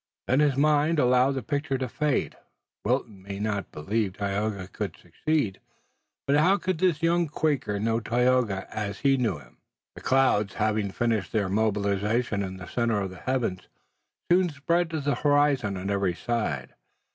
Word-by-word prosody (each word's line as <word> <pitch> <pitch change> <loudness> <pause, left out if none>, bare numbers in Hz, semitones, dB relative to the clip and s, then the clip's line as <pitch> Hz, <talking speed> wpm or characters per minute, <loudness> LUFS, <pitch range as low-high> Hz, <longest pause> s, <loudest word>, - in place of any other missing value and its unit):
Then 130 - +3
his 145 -3 +3
mind 150 +2 +3
allowed 125 0 +4
the 130 -3 -3
picture 145 +1 -1
to 130 0 -2
fade. 150 +2 -1 0.5
Wilton 115 -4 -1
might 100 +1 -5
not 105 -2 -2
believe 100 +5 -1
Tayoga 100 -1 -2
could - - -5
succeed, 145 -12 -1 0.7
but 140 +1 +3
how 180 +6 +4
could 185 -4 -2
this 170 -3 +1
young 170 0 +3
Quaker 135 -9 -1
know 115 +2 +1
Tayoga 120 -3 +1
as 100 -2 -4
he 140 -1 +4
knew 115 - 0
him? 60 -4 -17 0.4
The - - -11
clouds, 130 -7 +2
having 110 -1 0
finished 110 -3 -1
their 105 -4 0
mobilization 105 +1 0
in 95 -1 -4
the 95 - -8
center 115 0 0
of 95 -2 -3
the 95 - -10
heavens, 120 -6 -2 0.6
soon 180 0 +4
spread 165 +4 0
to 160 -2 -3
the 145 0 +1
horizon 145 -8 +2
on 95 +2 -3
every 100 -3 0
side. 110 - -2
115 Hz, 165 wpm, -26 LUFS, 100-145 Hz, 0.7 s, allowed